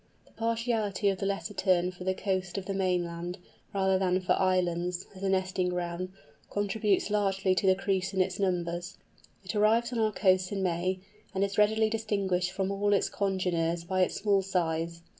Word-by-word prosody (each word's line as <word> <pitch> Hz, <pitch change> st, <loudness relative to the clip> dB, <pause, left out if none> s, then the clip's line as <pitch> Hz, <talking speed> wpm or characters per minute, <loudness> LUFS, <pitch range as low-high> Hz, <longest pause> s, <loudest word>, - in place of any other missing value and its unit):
The -, -, -24 dB
partiality 225 Hz, -3 st, 0 dB
of 195 Hz, -2 st, -1 dB
the 195 Hz, -, -1 dB
Lesser 200 Hz, +1 st, -3 dB
Tern 185 Hz, -2 st, +2 dB
for 180 Hz, 0 st, -10 dB
the 190 Hz, 0 st, +1 dB
coast 190 Hz, -1 st, -2 dB
of 195 Hz, -, -4 dB
the 195 Hz, -, -2 dB
mainland, 175 Hz, -2 st, -1 dB, 0.3 s
rather 190 Hz, -1 st, +2 dB
than 185 Hz, -1 st, +2 dB
for 185 Hz, -, -2 dB
islands, 180 Hz, -1 st, 0 dB
as 190 Hz, -, -12 dB
a 195 Hz, -, 0 dB
nesting 185 Hz, -1 st, +1 dB
ground, 180 Hz, 0 st, -3 dB, 0.4 s
contributes 205 Hz, 0 st, 0 dB
largely 195 Hz, -2 st, +2 dB
to 190 Hz, +1 st, +1 dB
the 190 Hz, -, +6 dB
decrease 190 Hz, -1 st, -1 dB
in 190 Hz, -, -2 dB
its 185 Hz, -, +1 dB
numbers. 175 Hz, -2 st, -1 dB, 0.5 s
It 190 Hz, -, -5 dB
arrives 225 Hz, +3 st, +3 dB
on 235 Hz, -, -1 dB
our 220 Hz, -1 st, +2 dB
coasts 185 Hz, -3 st, +2 dB
in 195 Hz, -1 st, -1 dB
May, 185 Hz, +1 st, 0 dB, 0.3 s
and 190 Hz, -, +2 dB
is 200 Hz, +1 st, -1 dB
readily 220 Hz, +1 st, +4 dB
distinguished 200 Hz, -5 st, 0 dB
from 190 Hz, +1 st, -2 dB
all 205 Hz, +1 st, +1 dB
its 200 Hz, -, +2 dB
congeners 175 Hz, -4 st, 0 dB
by 185 Hz, +2 st, 0 dB
its 185 Hz, -, +1 dB
small 200 Hz, -1 st, +2 dB
size. 170 Hz, -3 st, -1 dB
190 Hz, 185 wpm, -29 LUFS, 180-200 Hz, 0.5 s, the